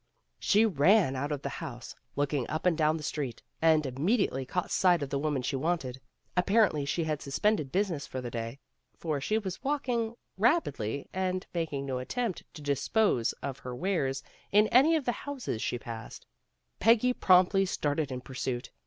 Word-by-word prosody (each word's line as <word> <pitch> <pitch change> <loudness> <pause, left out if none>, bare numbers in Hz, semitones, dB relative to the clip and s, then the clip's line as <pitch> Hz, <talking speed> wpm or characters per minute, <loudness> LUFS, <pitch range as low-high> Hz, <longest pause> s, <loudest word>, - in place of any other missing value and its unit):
She 210 +2 +4
ran 180 -3 +4
out 140 +3 -2
of 145 -2 -3
the 140 - -2
house, 125 -3 -7 0.2
looking 145 -2 0
up 155 - -3
and 180 -2 +4
down 155 0 +2
the 155 - -8
street, 140 -5 -4 0.2
and 160 -2 +4
immediately 135 - 0
caught 180 +5 -2
sight 175 -5 +3
of 135 - -6
the 140 - 0
woman 145 -3 -1
she 135 - -1
wanted. 135 -3 -2 0.3
Apparently 185 -5 +3
she 165 +4 0
had 155 -2 -2
sus 140 -1 -4
pended 205 -11 +1
business 185 -6 -1
for 130 - -5
the 120 -2 -5
day, 115 +2 -4 0.4
for 155 -4 -2
she 215 +10 +1
was 190 -5 -5
walk 285 -1 -1
ing, 235 -2 0 0.2
rapidly 145 - +1
and 185 0 -1
making 155 -5 -2
no 130 -2 -2
attempt 220 - -3
to 150 - -9
dispose 145 - +1
of 140 -1 -4
her 125 -1 -6
wares 140 -5 -1 0.3
in 210 +2 +5
any 285 +7 +6
of 305 -5 -1
the 245 - +2
houses 255 - -5
slier 120 - -1
passed. 115 -2 -8 0.5
Peggy 235 +3 +4
promptly 185 -1 +5
started 150 -5 -1
in 125 -1 -4
pursuit. 130 -1 -4
155 Hz, 180 wpm, -30 LUFS, 135-200 Hz, 0.5 s, any